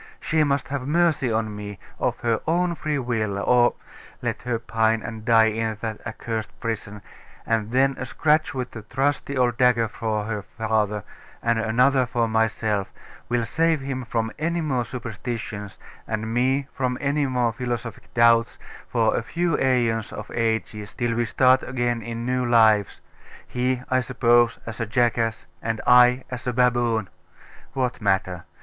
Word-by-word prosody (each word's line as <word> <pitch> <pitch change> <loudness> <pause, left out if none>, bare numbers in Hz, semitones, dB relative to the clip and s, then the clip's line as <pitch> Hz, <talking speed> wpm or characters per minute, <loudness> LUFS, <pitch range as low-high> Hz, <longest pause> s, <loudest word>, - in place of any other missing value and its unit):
She 155 -1 +1
must 140 -2 0
have 135 -2 -3
mercy 155 -5 +2
on 110 -1 -1
me, 105 -1 -7 0.2
of - - -1
her 115 -1 +1
own 175 +2 +2
free 155 -2 -2
will, 110 -6 -1
or 120 +4 +3 0.4
let - - -3
her 125 -1 -1
pine 110 0 0
and 110 -1 -7
die 115 -1 +5
in 110 0 -2
that 110 -2 -4
accursed 110 -1 -4
prison; 105 -3 -4 0.4
and 110 -2 0
then 135 +3 +2
a - - -4
scratch 155 0 +2
with 125 -1 -3
the 110 - -8
trusty 140 +5 -1
old 120 -2 +1
dagger 125 -3 +4
for 110 0 -2
her 105 -1 -3
father, 105 -1 -1 0.4
and 115 -1 +2
another 125 +3 +3
for 120 -1 0
myself, 110 -2 0 0.4
will 120 -1 +1
save 160 +4 +1
him 135 -1 -4
from 115 -1 -2
any 170 +2 0
more 135 -7 -1
superstitions, 110 -4 -6 0.3
and 110 0 -3
me 130 +3 +1
from 125 -1 -1
any 145 0 0
more 125 -3 +1
philosophic 120 -1 -5
doubts, 115 -1 +4 0.3
for 115 -3 +1
a - - 0
few 170 -2 -1
aeons 120 -4 +1
of 105 +1 -8
ages, 110 -2 -2
till 120 -1 0
we 120 +1 0
start 130 +3 +4
again 120 -2 -1
in 115 +1 -5
new 125 0 0
lives 110 -4 +3 0.5
he, 125 0 -1
I 130 - +4
suppose, 120 -2 +3
as 115 0 -7
a 115 - -2
jackass, 115 0 +1 0.2
and 115 -1 -2
I 125 +1 +6
as 125 0 -6
a 125 - 0
baboon. 120 -3 +2 0.7
What 125 -2 -2
matter? 95 -3 0
120 Hz, 160 wpm, -24 LUFS, 110-130 Hz, 0.7 s, I